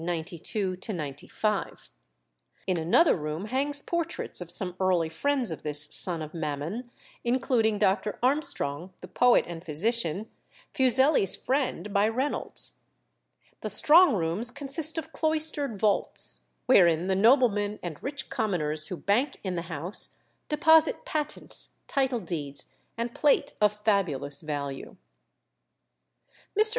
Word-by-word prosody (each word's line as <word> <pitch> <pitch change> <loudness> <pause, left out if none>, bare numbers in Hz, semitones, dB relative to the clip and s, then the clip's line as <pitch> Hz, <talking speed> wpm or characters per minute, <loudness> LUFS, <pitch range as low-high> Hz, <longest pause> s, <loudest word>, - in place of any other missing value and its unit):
In 185 -2 -1
another 175 - +3
room 155 +3 -5
hang 265 +6 -2
portraits 335 - -1
of 175 - -8
some 180 +1 +3
early 180 -4 0
friends 255 - -1
of 160 - -7
this 150 0 +4
son 170 -3 +8
of 155 - -10
Mammon, 160 - -5 0.3
including 235 -3 0
Dr. 200 +2 -1
Armstrong, 190 - 0
the - - -10
poet 245 0 +2
and 170 -1 -9
physician, 190 +3 -1 0.5
Fuseli's 260 - +3
friend, 260 -6 -3
by 200 +1 +2
Reynolds. 255 +6 -2 0.8
The - - -6
strong 320 -2 +5
rooms 180 +7 -1
consist 285 +4 +2
of 320 0 -6
cloistered 310 -7 0
vaults, 210 -1 +2 0.2
wherein 175 -8 +3
the 190 0 0
noblemen 210 -2 +2
and 170 -4 -7
rich 275 -1 -6
commoners 170 - -2
who 180 - -6
bank 245 - -1
in 190 -2 -4
the 170 0 -6
house 165 +5 -2 0.3
deposit 320 +1 +3
patents, 300 -1 -4
title 265 -4 -1
deeds, 150 -6 -5 0.2
and 235 +1 -4
plate 295 -2 +1
of 210 0 +2
fabulous 150 -10 +1
value. 145 -3 -6 1.6
Mr. 435 0 +8
210 Hz, 120 wpm, -26 LUFS, 165-265 Hz, 1.6 s, son